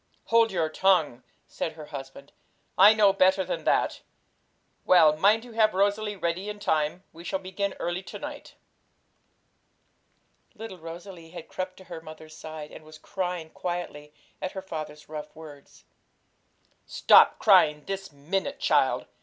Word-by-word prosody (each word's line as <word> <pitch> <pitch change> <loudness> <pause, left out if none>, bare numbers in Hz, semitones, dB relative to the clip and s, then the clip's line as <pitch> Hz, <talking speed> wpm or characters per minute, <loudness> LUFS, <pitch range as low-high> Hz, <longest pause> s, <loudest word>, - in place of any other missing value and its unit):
'Hold 230 -1 +4
your 170 -4 0
tongue!' 155 -7 +2 0.2
said 160 - -5
her 155 -1 -10
husband; 135 0 -9 0.4
'I 205 +3 +7
know 205 -2 +5
better 190 -1 +3
than - - -4
that. - - +1 0.8
Well, 160 -4 +5
mind 210 +8 +3
you 245 - -12
have 220 -3 +2
Rosalie 205 +2 +1
ready 185 +2 -3
in 210 - -6
time; 160 -2 -1
we 165 +1 -12
shall 175 - -2
begin 190 +1 -4
early 175 +1 -2
to 190 - -9
night.' 295 -1 -9 2.0
Little 210 -4 -9
Rosalie 170 +1 -10
had 170 -1 -10
crept 185 0 -5
to 190 - -13
her 170 -3 -9
mother's 155 -1 -12
side, 155 -1 -9
and - - -12
was 155 0 -14
crying 180 -4 -4
quietly 175 -4 -5 0.3
at 185 - -4
her 190 - -5
father's 155 -4 -7
rough 150 0 -8
words. 150 -3 -14 1.0
'Stop - - +5
crying 150 -1 +4
this 195 -2 -5
minute, 190 - -3
child!' - - +2
175 Hz, 145 wpm, -26 LUFS, 155-195 Hz, 2.0 s, I